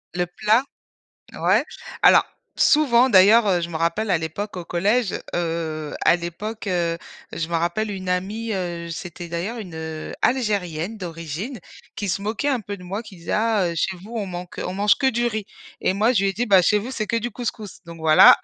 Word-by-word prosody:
Le 180 0 0
plat, 215 +8 +2 0.8
ouais. - - +3 0.4
Alors - - +7 0.3
souvent, 260 -4 +4
d'ailleurs, 205 +2 +7
heu, 180 -2 +3
je 170 - -3
me 170 - -9
rappelle, 170 +7 0
à 175 - +3
l'époque, 175 +6 -5
au 175 - -5
collège, 205 +6 +1 0.2
heu, 165 -3 -2
à - - +6
l'époque, 195 +6 -5
heu, 170 -2 0 0.4
je 165 - -3
me 170 - -4
rappelle 210 +6 -1
une 190 -2 -5
amie, 205 +5 -2
heu, 175 -3 -3
j 170 - -6
c'était 175 +1 -7
d'ailleurs 180 +8 -3
une, 180 -6 -8
heu, 160 -1 -6
Algérienne 205 -6 0
d'origine, 175 - -6 0.4
qui 205 - -3
se 195 - -1
moquait 215 +6 -2
un 260 -5 +1
peu 205 0 -6
de 180 - -13
moi, 195 +5 -4
qui 205 -4 -13
disait: 170 - -6
«Ah, 215 -3 +2
heu, 170 - -5
chez 190 +4 -1
vous, 195 +6 -12
on 210 -4 -2
manque, 180 -1 -7
heu, - - -3
on 180 - -4
mange 205 +1 +4
que 265 - +2
du 240 0 0
riz» 215 -3 -2 0.4
et 185 - +1
moi, 220 +5 +3
je 205 -6 +2
lui 195 - +2
ai - - -5
dit: 235 +6 -2
«Bah, 195 -4 +6
chez 210 +4 +3
vous, 235 +6 -5
c'est 215 -4 -3
que 230 - +1
du 235 +1 -2
couscous, 220 -4 -5
donc 170 0 -10
voilà», 160 -1 +8
195 Hz, 220 wpm, -23 LUFS, 170-220 Hz, 0.8 s, voilà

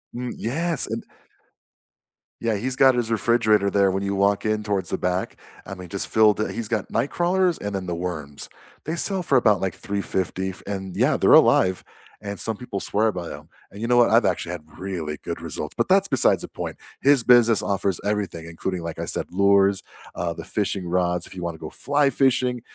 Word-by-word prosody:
Mm, 125 0 -4
yes, 160 +6 -1
and - - -4 1.4
Yeah, 115 -2 0
he's 125 +5 -2
got 130 -1 +5
his 120 -2 -1
refrigerator 110 -3 +3
there 100 -1 +3
when 95 +1 -2
you 100 0 -1
walk 100 +1 +1
in 110 0 0
towards 100 -4 -2
the - - -1
back, 90 +1 -2 0.3
I 95 - -7
mean, 90 -1 -9
just 100 - -2
filled, 110 -1 +4
it - - -2
he's 115 -2 -4
got 110 -3 -2
nightcrawlers 175 +8 +1
and 105 - -3
then 95 -1 -3
the 85 - -3
worms. 75 -5 -5 0.4
They 160 - -2
sell 190 +2 0
for 140 -5 +3
about 105 -5 +3
like, 95 -3 -2
350 95 -2 -3
f 90 - -9
and 95 -2 -5
yeah, - - +2
they're - - +3
alive, 95 0 +5 0.4
and 100 -1 -6
some 115 -2 -3
people 100 -5 -5
swear 110 +3 +1
by 90 -4 -6
'em, - - -12 0.2
and 100 - -11
you 115 - -2
know 120 0 +3
what, 120 - +5
I've - - +4
actually - - -1
had 75 - -7 0.2
really 85 -6 -4
good - - -5
results, - - -5
but - - +1
that's 195 +1 +4
besides 130 - +2
the - - -6
point. - - -6 0.2
His 140 -3 +4
business 120 -4 +5
offers 100 -2 -1
everything, 100 -5 -2
including, 85 +2 -4
like 85 -1 -6
I - - -2
said, - - -2
lures, 100 +1 +3 0.3
uh, 85 -1 -2
the - - -8
fishing 100 -3 -2
rods, 90 -1 0
if - - -13
you 90 - -6
want 85 -1 -3
to - - -15
go 80 - -7
fly 145 +1 +1
fishing, 125 -3 +1
100 Hz, 210 wpm, -23 LUFS, 95-120 Hz, 1.4 s, got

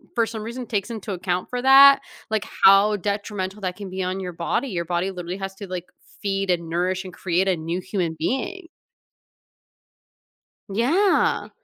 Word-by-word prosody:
for 230 - +3
some 220 -2 -6
reason- 240 +2 -6
takes 205 0 -2
into 215 -3 -5
account 180 0 -2
for 250 0 -3
that, 275 +1 +8 0.3
like, 215 -1 -1 0.2
how 200 +2 +7
detrimental 200 0 -3
that 185 -1 -3
can 200 -2 -7
be 185 0 -3
on 185 +1 -2
your 180 -2 -5
body, 170 +11 -1
your 175 -7 -2
body 175 +3 -1
literally 180 0 -6
has 195 0 -6
to, 200 -1 -8
like, 180 -1 -5 0.4
feed, 195 -1 -1
and 170 -2 0
nourish, 185 +3 -1
and 180 - -9
create 185 +1 0
a 185 - +3
new 165 +3 -3
human 180 -3 -2
being. 335 - -2 2.0
Yeah. 295 - +2
195 Hz, 170 wpm, -23 LUFS, 180-220 Hz, 2.0 s, that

